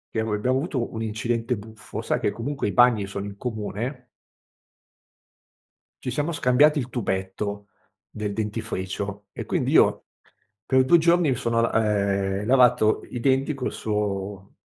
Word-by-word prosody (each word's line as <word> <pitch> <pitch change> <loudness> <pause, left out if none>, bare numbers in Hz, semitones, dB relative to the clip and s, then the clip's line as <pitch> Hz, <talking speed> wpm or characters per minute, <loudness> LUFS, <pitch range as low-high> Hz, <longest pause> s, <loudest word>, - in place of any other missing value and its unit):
che 110 - +2
ero 110 0 -2
e - - +1
abbiamo 130 +5 +1
avuto 135 -6 -3
un 110 - -4
incidente 115 +2 -1
buffo, 110 +1 -8
sai - - -1
che - - +1
comunque 130 +1 -3
i - - -2
bagni 120 -4 +4
sono 100 0 -5
in 100 -1 -7
comune 120 +3 -4 2.0
ci 125 - -3
siamo 145 +6 -1
scambiati 150 +1 +4
il 130 -2 -4
tubetto 100 -3 -3 0.4
del 105 -1 -4
dentifricio, 105 -2 -4
e - - -6
quindi - - -1
io - - +4 0.6
per 130 0 +4
2 170 +6 +6
giorni 170 -1 +3
mi 130 - +2
sono 115 -2 0
l 115 - +1
ehm, 100 -2 +1
lavato 125 -4 +4
i 125 - -5
denti 135 +4 +2
col 135 -3 -3
suo 100 -2 -3
110 Hz, 155 wpm, -24 LUFS, 100-125 Hz, 2.0 s, 2